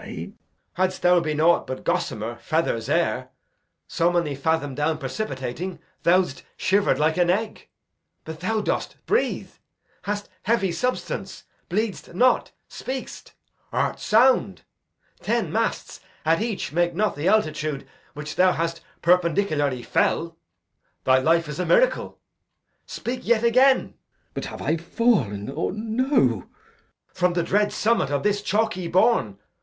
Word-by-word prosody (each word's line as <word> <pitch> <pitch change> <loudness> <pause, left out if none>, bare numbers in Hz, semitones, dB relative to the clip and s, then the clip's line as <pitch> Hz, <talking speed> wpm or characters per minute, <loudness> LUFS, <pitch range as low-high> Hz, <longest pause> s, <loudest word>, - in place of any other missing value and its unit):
Edg. - - -7 0.4
Hadst 185 0 0
thou 180 0 +5
been 155 -3 -2
aught 170 +2 +3
but 130 - -5
gossamer, - - -2
feathers, - - -1
air, - - 0 0.6
So 170 +1 +1
many 170 -4 0
fadom 145 0 0
down 150 +3 0
precipitating, 145 - -4 0.3
Thou'dst 175 -5 +2 0.2
shiver'd 200 +1 +2
like 155 +3 +1
an 175 -1 +3
egg; 215 +4 -2 0.6
but 160 0 -7
thou 215 +5 0
dost - - -2
breathe; 445 - 0 0.5
Hast 205 0 -3
heavy 200 -4 +1
substance; 250 +8 -3 0.3
bleed'st 205 -3 -3
not; 250 +6 +3 0.2
speak'st; 260 0 -7 0.4
art - - -1
sound. 220 - +3 0.6
Ten - - -1
masts - - -2 0.3
at 165 +3 +3
each 215 - -3
make 175 0 +1
not 210 +3 +1
the 145 +4 -2
altitude 155 -8 0 0.3
Which 150 0 -6
thou 185 0 +5
hast 165 0 -2 0.2
perpendicularly 165 -7 +2
fell. 165 +6 0 0.7
Thy 130 0 +4
life 165 +4 +2
is 150 +1 -6
a 180 - 0
miracle. - - +2 0.7
Speak 250 +1 -4
yet 235 -2 +2
again. 255 +3 +4
Glou. - - -26 0.4
But - - -4
have - - -7
I 160 - +1
fall'n, 160 - 0
or 135 - -2
no? 220 +5 -2
Edg. 125 - +2 0.7
From 180 -1 +1
the 175 -1 0
dread 205 +4 +1
summit 225 -10 +1
of 145 -1 -1
this 205 -1 +1
chalky 205 -3 0
bourn. 180 - +2
175 Hz, 140 wpm, -24 LUFS, 155-215 Hz, 0.7 s, thou